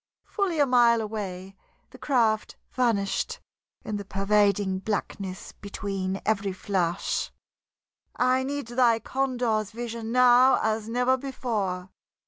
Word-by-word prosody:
Fully 395 -6 -1
a 290 - +5
mile 240 -3 +4
away, 195 -3 -5 0.4
the - - -14
craft 230 -6 +1 0.2
vanished 225 -6 0 0.5
in 215 - -3
the 200 - -5
pervading 200 -1 +1
blackness 195 -1 -4
between 195 -2 -4
every 200 -3 0
flash. 185 -2 -1 0.8
"I 255 +1 +2
need 280 +1 -3
thy 240 -2 +3
condor's 245 -4 -1
vision 230 -1 -5
now 250 +1 +6
as 220 0 -1
never 250 +2 +2
before. 210 -9 -3
220 Hz, 110 wpm, -26 LUFS, 195-250 Hz, 0.8 s, now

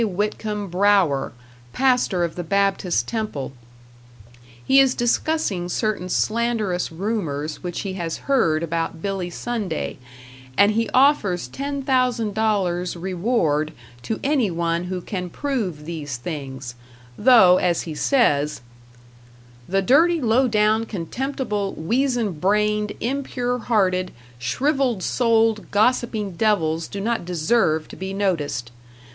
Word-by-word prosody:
Whitcomb 210 +1 -2
Brougher, 185 -7 +3 0.4
pastor 250 -9 +2
of 170 -2 -2
the 175 - -4
Baptist 195 0 +1
Temple. 215 - -3 1.1
He 270 - +5
is 270 -2 +4
discussing 240 - 0
certain 205 -2 -1
slanderous 215 -5 0
rumors 160 -6 -3
which 175 -1 -4
he 195 -2 -4
has 170 -3 -3
heard 170 - +2
about 165 0 -3
Billy 195 -3 -2
Sunday, 205 - -4 0.6
and 200 +4 +6
he 230 +1 0
offers 235 - +3
ten 280 - -4
thousand 250 -5 +1
dollars 190 -5 0
reward 170 -4 0 0.3
to 220 - -3
anyone 175 - 0
who 180 0 -4
can 180 -2 -5
prove 200 - -3
these 150 -6 -5
things; 135 -3 -6 0.4
though, 205 - +6
as 175 -2 +1
he 160 - -6
says, 150 - +1 1.1
The 195 +1 +1
dirty, 325 - +4
low 250 0 +3
down, 215 0 +2
contemptible, 210 - -3
weazen 230 - 0
brained, 210 +3 +1
impure 250 -1 -2
hearted, 185 -6 +1 0.3
shrivelled 255 - 0
souled, 225 -3 +2
gossipping 215 -2 +1
devils 165 -5 +1
do 200 - -6
not 230 +1 -1
deserve 170 -2 +1
to - - -10
be 190 +1 -5
noticed.... 150 -11 -1
200 Hz, 115 wpm, -22 LUFS, 170-235 Hz, 1.1 s, and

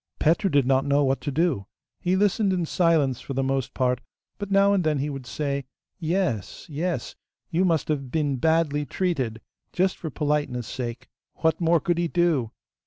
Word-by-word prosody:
Petru 165 +5 +2
did 140 -5 +3
not 135 +1 +3
know 140 +1 +3
what 135 0 +1
to - - -3
do. 145 - 0 0.3
He 180 +1 +1
listened 200 +1 +2
in 180 -2 0
silence 160 -7 +2
for 135 - -6
the 135 - +1
most 135 -1 -1
part, 125 -1 +1 0.4
but 205 -1 -4
now 200 0 +4
and 190 -3 +2
then 155 -2 +1
he 145 +2 -1
would 135 -3 -7
say, 140 +1 -2 0.3
'Yes, 165 - -1
yes, 165 +4 -3 0.4
you 175 +3 +2
must 165 -4 +2
have 140 -4 -2
been 145 -1 0
badly 160 0 +2
treated,' 135 -8 -2 0.3
just 185 +1 +1
for 160 - -5
politeness' 145 -5 -1
sake; 120 0 -5 0.3
what 160 +1 +1
more 165 0 +4
could 170 +3 0
he 175 - +1
do? 165 -9 +1
150 Hz, 180 wpm, -25 LUFS, 135-175 Hz, 0.4 s, now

